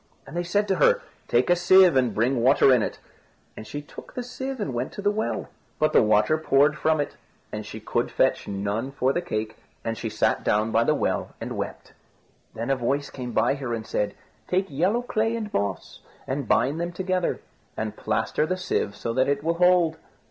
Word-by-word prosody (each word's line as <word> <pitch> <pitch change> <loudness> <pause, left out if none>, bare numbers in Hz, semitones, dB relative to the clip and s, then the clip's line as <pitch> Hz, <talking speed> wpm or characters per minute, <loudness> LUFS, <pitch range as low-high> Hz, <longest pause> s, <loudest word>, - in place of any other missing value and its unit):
And 135 - -10
they 175 - 0
said 205 +4 0
to 190 - +2
her, 150 - +4 0.2
"Take 120 +8 +2
a - - +6
sieve 180 -1 +6
and 125 -5 +2
bring 120 +3 +1
water 130 +1 +5
in 125 - +4
it." - - -3 0.6
And 110 - -9
she 145 0 -6
took - - -12
the 250 - -3
sieve 260 +1 -5
and 145 -11 -2
went 120 +2 -2
to 205 - -6
the 205 - +3
well; 215 +1 -2 0.3
but 155 - +2
the - - +7
water 105 +8 +3
poured 145 -1 +3
from 155 0 +1
it, 145 - -3 0.3
and - - -5
she - - -7
could - - -1
fetch - - +1
none 100 +5 -2
for 135 -1 +1
the 175 - 0
cake, 110 -10 -4 0.3
and 115 0 -2
she 115 - -4
sat 110 - 0
down 105 +2 +1
by 115 - +3
the 150 - +3
well - - -2
and - - -5
wept. - - -6 0.6
Then 115 +4 -2
a - - +3
voice 135 +3 -1
came 125 -2 -6
by 115 +2 +2
her 130 -4 -3
and 110 -1 -6
said, 105 -2 -2 0.3
"Take 190 -1 0
yellow 185 - +1
clay 225 -1 0
and 215 -3 -5
moss, 100 -2 -3 0.3
and 135 -1 -3
bind 135 +10 +2
them 170 0 -2
together, 185 -1 -1 0.4
and - - -3
plaster 155 - -1
the 185 - -1
sieve 105 - -1
so 115 - -3
that 130 +3 +2
it 140 0 0
will 165 +1 +1
hold." 180 -3 +4
140 Hz, 215 wpm, -25 LUFS, 115-180 Hz, 0.6 s, the